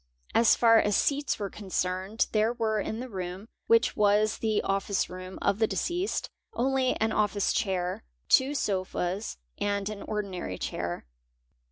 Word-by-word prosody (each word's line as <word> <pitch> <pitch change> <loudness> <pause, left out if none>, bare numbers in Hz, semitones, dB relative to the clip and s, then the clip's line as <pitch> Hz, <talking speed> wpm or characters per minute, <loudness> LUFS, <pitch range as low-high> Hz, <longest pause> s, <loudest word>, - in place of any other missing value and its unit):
As 230 - +5
far 230 -1 +6
as 205 -2 +2
seats 285 0 +1
"were 200 -2 -4
concerned 190 +1 -1
there 215 +1 +2
were 220 -3 0
in 220 +2 -3
the 255 - -5
room, 190 -1 -6 0.2
which 230 +1 +4
was 210 0 +3
the 215 -2 +1
office 195 0 0
room 185 +1 -8
of 200 - +2
the 220 - +3
deceased, 360 - -1 0.3
only 260 +1 +1
an 220 0 0
office 210 -2 +1
chair, 180 - -1 0.2
two 270 +3 +4
sofas 190 -2 -2 0.2
and 200 0 -1
an 210 -2 -6
ordinary 190 - -4
chair. 85 -4 -4
210 Hz, 150 wpm, -28 LUFS, 190-225 Hz, 0.3 s, far